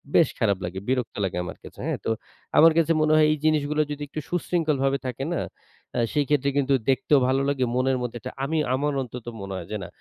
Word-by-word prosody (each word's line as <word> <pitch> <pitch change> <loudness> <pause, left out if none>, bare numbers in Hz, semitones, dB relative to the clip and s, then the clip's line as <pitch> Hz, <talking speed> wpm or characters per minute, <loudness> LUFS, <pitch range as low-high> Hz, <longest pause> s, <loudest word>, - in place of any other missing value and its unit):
বেশ 165 - +6
খারাপ 100 -4 +2
লাগে। 95 +2 -4
বিরক্ত 125 -2 -1
লাগে 90 -2 -2
আমার - - -7
কাছে, - - -12
হ্যাঁ? - - -1
তো - - 0 0.5
আমার 165 +1 +8
কাছে 165 -1 +3
মনে 155 0 +3
হয় 155 0 +6
এই 155 - +1
জিনিসগুলো 150 -1 +2
যদি 145 0 -5
একটু 150 - -5
সুশৃঙ্খলভাবে 155 -6 +1
থাকে 130 +2 -4
না? 170 - -1 0.5
অ্যা 120 - 0
সেই 145 -1 +2
ক্ষেত্রে 140 -1 +2
কিন্তু 140 -1 +2 0.2
দেখতেও 135 +2 +4
ভালো 135 +1 +2
লাগে। 140 -2 0
মনের 130 +1 +2
মধ্যে 120 -1 -4
একটা 130 - -6
আমি 160 +4 0 0.2
আমার 145 +2 0
অন্তত 125 -1 -7 0.2
মনে 100 0 -5
হয় 85 -2 -7
যে, 105 - -1
না - - -6
135 Hz, 220 wpm, -25 LUFS, 125-150 Hz, 0.5 s, আমার